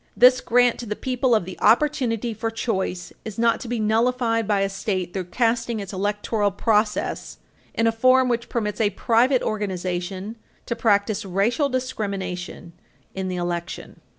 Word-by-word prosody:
This 255 +1 +6
grant 245 0 +3
to 240 - -6
the 210 - -2
people 255 0 +1
of 215 - +1
the 185 - -9
opportunity 240 -4 +2
for 225 +2 -3
choice 190 -5 -3
is 215 -2 -7
not 230 0 +2
to - - -7
be 240 0 -2
nullified 230 +1 +1
by 205 -2 +2
a 195 - +2
state 190 -3 -3
through 190 -2 -3
casting 230 +3 0
its 200 -1 -7
electoral 205 +2 0
process 210 +1 0 0.4
in 230 - +1
a 225 - +4
form 255 +3 +4
which 235 -1 -1
permits 210 -2 -2
a 210 - +3
private 245 +5 +2
organization 190 0 -3 0.3
to 235 - -2
practice 205 -2 +1
racial 210 - +1
discrimination 195 -9 -4 0.4
in 190 0 -3
the 185 - -3
election. 175 -1 -4
220 Hz, 160 wpm, -23 LUFS, 195-235 Hz, 0.4 s, This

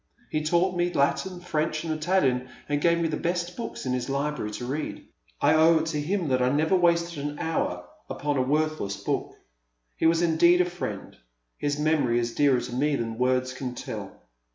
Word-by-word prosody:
He 155 - 0
taught 175 +4 +1
me 175 0 +1
Latin, 145 +6 0
French, 155 -2 -1
and 160 -1 -1
Italian, 155 -6 +1 0.2
and 145 0 0
gave 170 +1 +4
me 165 - +1
the 155 -1 -2
best 175 +1 -2
books 235 - -6
in 130 - 0
his 125 +1 -2
library 140 -4 -2
to 125 - -5
read. 145 +5 -4 0.3
I 150 - +4
owe 160 +1 +6
it 160 - 0
to 150 - -1
him 180 +2 -1
that 130 -1 +2
I 125 - +3
never 155 +7 +2
wasted 170 -3 +2
an 145 0 -4
hour 90 - -2 0.2
upon 145 0 -2
a 130 - +2
worthless 150 -6 0
book. - - -3 0.6
He - - +2
was 165 +1 +3
indeed 170 +1 +5
a 180 - +4
friend. 175 - -6 0.4
His 145 0 -1
memory 150 -6 +2
is 120 -1 -1
dearer 140 -4 +3
to 120 - -6
me 145 +3 +1
than 115 -2 -4
words 130 0 +1
can 125 -1 -5
tell." 105 -6 -7
150 Hz, 200 wpm, -26 LUFS, 130-170 Hz, 0.6 s, owe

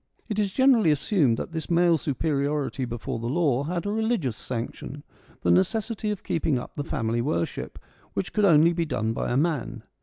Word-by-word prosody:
It 215 -2 -2
is 205 -2 +1
generally 255 -6 +4
assumed 150 - +2
that - - -5
this 160 -1 -5
male 170 0 +4
superiority 145 -2 -1
before 120 -1 -4
the 115 - -4
law 140 -2 +1
had 175 +3 -3
a 205 - -1
religious 220 - 0
sanction, 125 +5 -6 0.4
the 85 - +3
necessity 215 - +1
of 210 -2 -3
keeping 160 -5 0
up 125 - -7
the 145 - -4
family 115 -5 -1
worship, 145 +6 -2 0.4
which - - -3
could 210 -1 +3
only 165 -1 +6
be 170 0 0
done 115 -7 -1
by - - -2
a 120 - +2
man. 150 -4 -1
155 Hz, 185 wpm, -26 LUFS, 125-185 Hz, 0.4 s, only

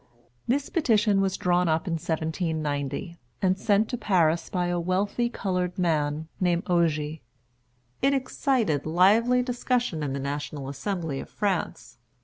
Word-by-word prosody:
This 275 +3 +1
petition 215 - +3
was 195 -1 0
drawn 180 -1 +2
up 160 +2 +1
in 175 - -2
1790, 160 0 -2 0.2
and 185 -1 +2
sent 205 +2 +2
to 245 - -3
Paris 170 -4 +2
by 180 -2 -1
a 175 0 0
wealthy 200 +7 0
colored 180 -5 -2
man 155 -3 0
named 175 -1 +1
Ogé. 160 -3 0 0.8
It 275 +1 +3
excited 245 - 0
lively 220 +9 +4
discussion 245 -7 -1
in 140 -2 -2
the 140 - -3
National 140 0 -4
Assembly 160 0 -3
of - - -8
France. 180 - -3
180 Hz, 135 wpm, -26 LUFS, 155-205 Hz, 0.8 s, lively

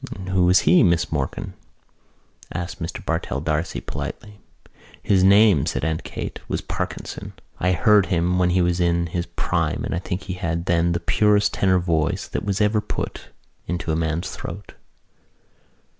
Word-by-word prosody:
"Who 95 -1 +3
was 90 +1 +5
he, 85 +3 +5
Miss 85 -1 +2
Morkan?" 75 -4 -3 1.0
asked 85 +1 -5
Mr 80 - -5
Bartell - - -2
D'Arcy 75 +3 -2
politely. 105 -1 -7 0.6
"His 95 -2 +3
name," 100 -5 +5
said - - -1
Aunt 80 0 -1
Kate, - - -6
"was - - -1
Parkinson. - - -5 0.3
I 90 +1 +2
heard 105 +3 +4
him 90 0 +1
when 90 -1 +3
he 90 0 +2
was 85 0 +1
in 85 -1 +2
his 85 +1 -3
prime - - -1
and - - -3
I 85 - -1
think 90 +1 -4
he 95 - -5
had 85 -2 -3
then 85 0 +2
the 85 - 0
purest 105 +4 +2
tenor 95 -1 +3
voice 80 -3 0
that - - -3
was 100 -1 -1
ever 105 +1 +3
put - - -5 0.4
into 85 -1 -2
a - - +1
man's 80 +2 -1
throat." 95 +5 -8
90 Hz, 165 wpm, -23 LUFS, 85-95 Hz, 1.0 s, was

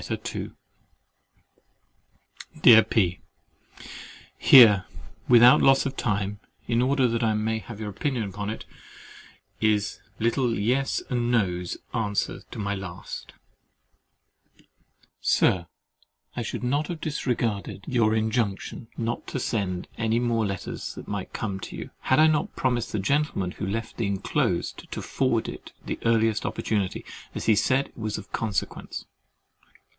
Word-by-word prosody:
LETTER - - -4
II - - -5 2.1
Dear 110 -2 +10
P——, 100 -5 +1 1.2
Here, 105 -8 +8 0.4
without 120 0 +8
loss 135 +1 +5
of 135 -1 -3
time, 100 -3 -1 0.3
in 115 0 +1
order 130 0 +3
that 115 -1 -1
I 110 -2 +2
may 110 +1 0
have 110 -1 -10
your 105 -1 -4
opinion 125 +3 -2
upon 100 +1 -4
it, 110 - -6 0.9
is 105 -2 +1 0.2
little 115 +1 +1
Yes 125 +7 0
and 120 -1 0
No's 90 -7 0 0.2
answer 105 -4 -1
to - - -9
my 100 -1 -1
last. 95 -2 -7 1.9
"Sir, 85 -3 +2 0.7
I 125 - -2
should 115 - -4
not 145 +5 0
have 170 -2 -5
disregarded 120 -10 -2
your 115 -4 +2
injunction 110 0 -1
not 115 0 -3
to 135 - -3
send 95 -7 -2
you - - -2
any 110 +1 +2
more 115 -3 +1
letters 100 -2 -5
that - - -9
might 100 -2 -4
come 100 -4 -3
to - - -8
you, - - -7
had 130 - +2
I 155 - +7
not 155 -2 +1
promised 120 -3 0
the - - -1
Gentleman 100 - 0
who 95 - -5
left 115 +3 -4
the 115 - 0
enclosed 100 -1 -1
to - - -4
forward - - 0
it - - -9
the - - -4
earliest 115 -1 +2
opportunity, 100 -4 -2 0.3
as - - -4
he 110 - +5
said 130 +6 +2
it - - -26
was 110 -2 -3
of - - -10
consequence. 110 -3 -3
110 Hz, 140 wpm, -26 LUFS, 100-120 Hz, 2.1 s, Dear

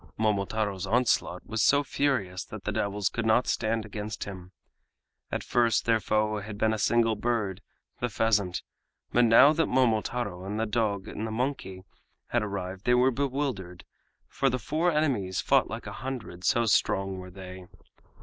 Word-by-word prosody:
Momotaro's 100 -2 -1
onslaught 110 -5 +1
was 110 -1 -2
so 145 +1 +4
furious 100 -11 -1
that - - -9
the - - -2
devils 100 -1 -1
could 120 - -2
not 110 +3 +3
stand 110 0 -1
against 105 +1 -5
him. 90 -2 -9 0.8
At - - -2
first 115 -5 +2
their 115 -1 +3
foe 110 0 0
had 105 +1 -7
been 110 +1 +2
a 110 - -2
single 115 +1 +3
bird, 105 -4 -1 0.4
the 120 - -1
pheasant, 105 -4 +1 0.5
but 120 0 +4
now 115 +6 +7
that 165 +1 +1
Momotaro 115 -5 0
and 100 +3 -4
the 110 - +1
dog 105 -3 -1
and 110 - -4
the - - -5
monkey 110 -6 -3 0.5
had 120 - +1
arrived 95 -2 -5
they 125 - +4
were 125 +2 +4
bewildered, 130 -9 -3 0.4
for 135 - 0
the 125 - -1
four 160 +9 0
enemies 125 - 0
fought - - +3
like - - -6
a - - -6
hundred, 125 -9 -6
so 120 +4 +3
strong 95 -3 +1
were 90 0 -9
they. 90 -1 -10
110 Hz, 170 wpm, -28 LUFS, 95-120 Hz, 0.8 s, now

